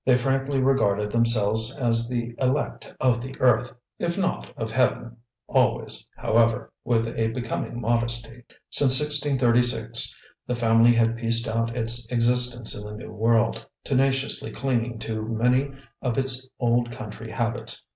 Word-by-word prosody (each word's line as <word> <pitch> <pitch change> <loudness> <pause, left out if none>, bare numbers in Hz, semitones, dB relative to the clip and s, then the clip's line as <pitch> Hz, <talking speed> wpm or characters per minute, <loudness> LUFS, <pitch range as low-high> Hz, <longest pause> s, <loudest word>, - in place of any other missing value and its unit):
They 125 -1 +4
frankly 135 +2 -1
regarded 105 -6 +1
themselves 110 +1 +1
as 115 -3 +2
the 120 -1 -3
elect 130 +3 -2
of 120 -2 +1 0.2
earth, 125 -1 +2 0.3
if 170 +1 -2
not 190 -2 -2
of 110 -1 -4
Heaven, 120 -1 0 0.3
always, - - 0
however, 115 +1 +1
with 115 -1 +1
a 115 0 0
becoming 120 0 -4
modesty. 115 0 -2 0.3
Since 130 -2 +5
1636 135 -5 +2 0.3
the 125 - -1
family 115 0 +4
had 115 0 +1
pieced 115 0 0
out 115 +1 -2
its 115 0 +2
existence 120 0 +2
in 105 - -7
the 105 - -8
New - - -10
World, 115 +1 +1 0.2
tenaciously 135 0 0
clinging 120 -3 -2
to 110 -1 -4
many 125 +5 +1 0.3
of 125 -3 -2
its 130 -1 0
old 120 0 +1
country 110 0 -8
habits. 115 +1 -3
120 Hz, 135 wpm, -24 LUFS, 115-130 Hz, 0.3 s, Since